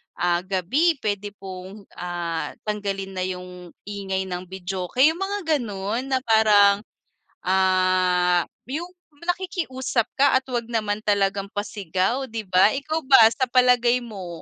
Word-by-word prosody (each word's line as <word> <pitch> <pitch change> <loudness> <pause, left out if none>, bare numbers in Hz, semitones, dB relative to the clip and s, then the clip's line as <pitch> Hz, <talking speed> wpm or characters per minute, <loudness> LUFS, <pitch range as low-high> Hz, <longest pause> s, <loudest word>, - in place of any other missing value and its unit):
ah 175 0 +1
gabi, 200 - +1
pwede 205 -1 -2
pong 190 +1 -9 0.2
ah, 175 -2 -3
tanggalin 200 -2 -3
na 185 - -1
yung 180 -1 -8
ingay 195 -2 -3
ng 180 0 -5
videoke?" 185 -1 -5 0.2
ung 330 - -8
mga 390 -5 0
gano'n, 215 0 -3
na 260 - 0
parang, 210 -3 +5 0.6
ah, 185 -2 +2 0.3
yung 315 +6 -3 0.3
nakikiusap 330 - -2
ka 280 -1 +3
at 260 - +1
'wag 240 -3 -3
naman 215 -3 -1
talagang 200 -1 0
pasigaw, 205 +5 -2
'di 225 -1 -5
ba? 185 +1 +5
Ikaw 310 +4 -2
ba 265 -5 +7
sa 260 +2 -1
palagay 250 -1 +4
mo? 200 -6 -8
205 Hz, 135 wpm, -23 LUFS, 185-250 Hz, 0.6 s, ba